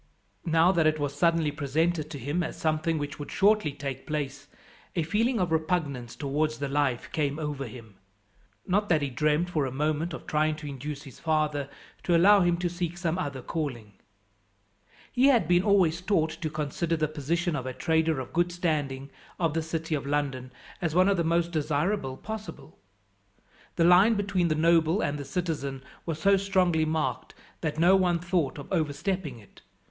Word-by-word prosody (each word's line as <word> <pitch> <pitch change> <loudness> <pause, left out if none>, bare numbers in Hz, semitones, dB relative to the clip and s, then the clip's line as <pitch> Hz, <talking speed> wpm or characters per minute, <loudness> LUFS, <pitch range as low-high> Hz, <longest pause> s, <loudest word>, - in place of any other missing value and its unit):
Now 165 +2 +4
that 165 -4 +3
it 155 0 +2
was 145 -2 -2
suddenly 165 0 +2
presented 155 +2 -1
to 155 - -6
him 145 +7 -2
as 160 - -4
something 160 +1 0
which 145 -1 -5
would 145 - -6
shortly 205 -5 +3
take 140 -2 -6
place, 145 -2 -4 0.5
a 170 - +1
feeling 225 +9 +1
of 180 -3 0
repugnance 155 -7 -1
towards 150 +2 -1
the 140 -1 -3
life 135 -3 -1
came 145 -2 -1
over 145 -4 -4
him. 110 -3 -12 0.7
Not 205 +3 +1
that 155 -4 +3
he 140 - -2
dreamt 150 +6 +1
for 150 -5 0
a - - -5
moment 155 +4 -1
of - - -10
trying 155 0 +1
to 150 0 -10
induce 145 +1 -6
his 135 -5 -13
father 150 -3 0 0.3
to 175 -2 +3
allow 200 +4 +6
him 175 -1 +2
to 175 0 -1
seek 175 0 -4
some 175 0 -1
other 140 -7 -4
calling. 125 -10 -4 1.2
He 255 +2 +4
had 240 - +4
been 175 +1 +4
always 180 -4 +3
taught 175 -5 +1
to 160 -1 -4
consider 155 +2 -2
the 155 -1 +1
position 160 +3 -1
of 130 -3 -4
a - - -2
trader 160 0 +1
of 130 - -7
good 175 +1 +1
standing, 145 -6 -2 0.3
of 165 -4 +1
the 165 - 0
city 160 0 -3
of 140 -2 -2
London, 135 -3 -2 0.3
as 165 -3 -1
one 185 +2 +5
of 200 - +2
the 170 - +1
most 170 +1 +1
desirable 150 -1 -1
possible. 220 0 -8 1.0
The 170 - +2
line 185 +6 +6
between 195 -4 0
the 155 - +1
noble 165 +3 +3
and 145 0 -1
the 140 - -6
citizen 140 -6 -3 0.2
was 165 -2 -2
so 195 +4 +4
strongly 185 -5 +2
marked 155 0 -2 0.3
that 155 -2 -2
no 175 +4 +5
one 180 -2 +3
thought 170 -5 -1
of 140 - -8
overstepping 160 - -1
it. 105 -3 -18
160 Hz, 185 wpm, -27 LUFS, 145-175 Hz, 1.2 s, allow